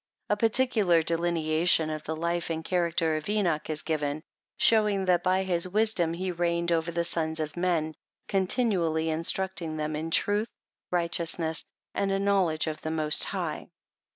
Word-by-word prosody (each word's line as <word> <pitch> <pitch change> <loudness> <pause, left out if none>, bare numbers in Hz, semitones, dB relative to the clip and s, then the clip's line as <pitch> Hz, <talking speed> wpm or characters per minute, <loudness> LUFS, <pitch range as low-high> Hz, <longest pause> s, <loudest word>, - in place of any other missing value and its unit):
A - - +4
particular 215 -6 +2
delineation 165 -1 +1
of 155 0 -4
the 160 - -3
life 170 +2 -2
and 160 0 -3
character 170 -3 0
of 155 +5 -6
Enoch 180 -9 0
is 155 -1 -2
given, 155 -1 -2 0.3
showing, 210 -4 +3
that 180 -2 +3
by 185 +1 +1
his 180 -2 +2
wisdom 200 -5 +1
he 185 +1 -3
reigned 170 0 -1
over 165 0 0
the 170 0 -1
sons 160 -1 0
of 155 -1 -3
men, 170 -3 0 0.3
continually 185 -6 +1
in 160 +1 -2
strucling 165 -3 -1
them 155 0 -2
in 160 +2 -4
truth, 205 +6 +1 0.4
righteousness, 170 -2 -1 0.3
and 195 -1 -1
a 195 - +1
knowledge 195 -5 +1
of 155 -1 -4
the 155 - -4
Most 155 -1 +1
High. - - -4
170 Hz, 160 wpm, -27 LUFS, 160-190 Hz, 0.4 s, A